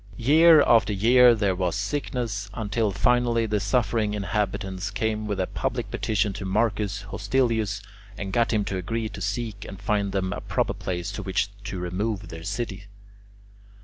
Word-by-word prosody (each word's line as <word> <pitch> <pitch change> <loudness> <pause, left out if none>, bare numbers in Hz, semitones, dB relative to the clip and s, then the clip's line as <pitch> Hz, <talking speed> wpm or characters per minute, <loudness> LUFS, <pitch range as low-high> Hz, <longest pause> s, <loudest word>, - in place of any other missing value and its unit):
Year 155 +5 +6
after 110 -3 +4
year 120 +4 +6
there 100 -3 +1
was 90 0 -1
sickness, 105 -2 -3
until 110 0 0
finally 120 +3 +2
the 105 -1 0
suffering 110 -2 0
inhabitants 100 -1 -2
came 110 +1 -2
with 100 -2 -2
a 95 - +1
public - - -3
petition 105 -2 0
to 100 - -6
Marcus 100 0 0
Hostilius 105 -1 0 0.3
and 95 -2 -5
got 115 -1 +2
him 105 -3 +1
to 95 - -3
agree 110 +4 -2
to 105 -2 -9
seek 105 +1 -3
and 95 - -9
find 100 0 0
them 95 -1 -1
a - - -5
proper - - -1
place 90 -1 -4
to - - -5
which 95 0 -1 0.2
to 100 -2 -4
remove 100 +4 -3
their 80 0 -8
city. 100 -1 -4
105 Hz, 165 wpm, -25 LUFS, 100-115 Hz, 0.3 s, Year